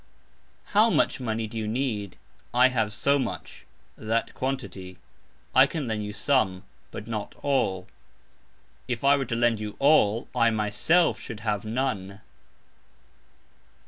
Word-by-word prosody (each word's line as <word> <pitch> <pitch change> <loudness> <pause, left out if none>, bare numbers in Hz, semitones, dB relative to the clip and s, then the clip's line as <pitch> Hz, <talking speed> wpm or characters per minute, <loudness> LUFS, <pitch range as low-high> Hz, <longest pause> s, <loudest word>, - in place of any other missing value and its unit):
"How 215 +3 +5
much" - - +1
money 115 -3 -2
do 110 - -10
you 110 - -3
need? 110 -5 -2 0.4
I 125 +1 +6
have 110 -4 0
"so 140 +6 +2
much 125 - -6 0.3
(that 115 +1 -2
quantity)", 120 -9 -5 0.6
I 130 +1 +7
can 150 -3 -4
lend 110 -2 -2
you 105 - -5
"some", 105 -6 +1 0.3
but - - -8
not 110 -3 -5
"all". 100 -10 0 1.0
If 120 -1 -3
I 140 +1 +6
were 135 -1 -1
to 120 - -3
lend 120 -1 +2
you 105 -1 -5
"all", 120 -7 +3
I 115 - +3
myself 110 - +2
should 110 -4 -8
have 105 -2 -2
"none". 110 -5 -3
115 Hz, 140 wpm, -26 LUFS, 105-135 Hz, 1.0 s, I